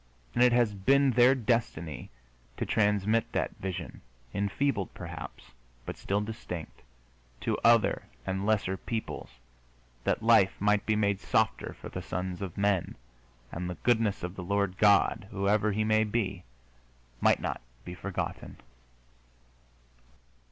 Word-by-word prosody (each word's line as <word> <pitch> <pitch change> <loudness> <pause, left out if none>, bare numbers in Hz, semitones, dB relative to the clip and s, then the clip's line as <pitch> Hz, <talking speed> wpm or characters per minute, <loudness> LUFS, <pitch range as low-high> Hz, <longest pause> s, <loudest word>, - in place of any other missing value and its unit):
And 120 - +1
it 125 - +6
has 120 -3 +3
been 135 +8 +3
their 125 +2 +6
destiny 105 - -1 0.5
to - - -1
transmit 105 +1 +2
that - - -1
vision, 95 -2 -5 0.3
enfeebled, 100 +2 -1
perhaps, - - -8 0.3
but - - -5
still 100 +1 -1
distinct, 105 -6 -7 0.6
to - - 0
other 115 -1 +4 0.2
and 95 +1 -2
lesser 100 -3 +1
peoples, 110 +3 -5 0.7
that - - 0
life 110 -4 +5
might 105 0 +2
be 110 - +3
made 100 -2 +1
softer - - 0
for - - -8
the - - -5
sons 90 +1 -4
of 95 -4 -5
men, 100 -3 +1 0.6
and 90 +1 -4
the 90 - -4
goodness 110 -6 +2
of 90 +1 -4
the 90 - -6
Lord 100 0 -1
God 100 -1 +4
whoever 105 +1 +1
He 105 +2 0
may 110 0 +3
be 100 -4 -2 0.8
might - - +4
not - - -3 0.2
be 90 - -6
forgotten. 95 0 -5
100 Hz, 135 wpm, -29 LUFS, 95-110 Hz, 0.8 s, it